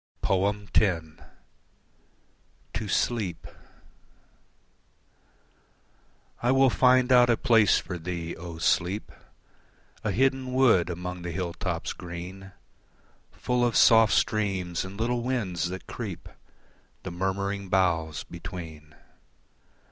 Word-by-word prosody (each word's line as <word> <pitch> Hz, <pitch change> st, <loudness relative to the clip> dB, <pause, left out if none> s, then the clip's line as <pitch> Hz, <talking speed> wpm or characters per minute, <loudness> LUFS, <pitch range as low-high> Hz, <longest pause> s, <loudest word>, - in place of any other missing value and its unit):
X. 100 Hz, -3 st, +1 dB, 1.7 s
To 110 Hz, -, -3 dB
Sleep 100 Hz, -5 st, -1 dB, 3.0 s
I 120 Hz, -, +2 dB
will 135 Hz, -1 st, +4 dB
find 130 Hz, 0 st, +4 dB
out 125 Hz, -1 st, +6 dB
a 115 Hz, -, +3 dB
place 110 Hz, -4 st, +4 dB
for 90 Hz, -2 st, -5 dB
thee, 85 Hz, 0 st, -5 dB
O 85 Hz, -1 st, -8 dB
Sleep 90 Hz, +4 st, 0 dB, 0.9 s
A 105 Hz, -, -1 dB
hidden 130 Hz, +4 st, +1 dB
wood 120 Hz, -10 st, +4 dB
among 90 Hz, +1 st, -5 dB
the 85 Hz, -, -5 dB
hill 85 Hz, 0 st, -3 dB
tops -, -, -3 dB
green, 90 Hz, +3 st, -8 dB, 0.8 s
Full 125 Hz, -1 st, -1 dB
of 120 Hz, -3 st, +1 dB
soft 115 Hz, -1 st, +6 dB
streams 95 Hz, -5 st, 0 dB
and 95 Hz, +2 st, -9 dB
little 120 Hz, +1 st, 0 dB
winds 105 Hz, -9 st, -2 dB
that 95 Hz, +1 st, -7 dB
creep 95 Hz, -8 st, -7 dB, 0.8 s
The 95 Hz, -, -5 dB
murmuring 95 Hz, +2 st, -3 dB
boughs 85 Hz, -5 st, +1 dB
between. 85 Hz, -4 st, -9 dB
95 Hz, 100 wpm, -27 LUFS, 85-115 Hz, 3.0 s, out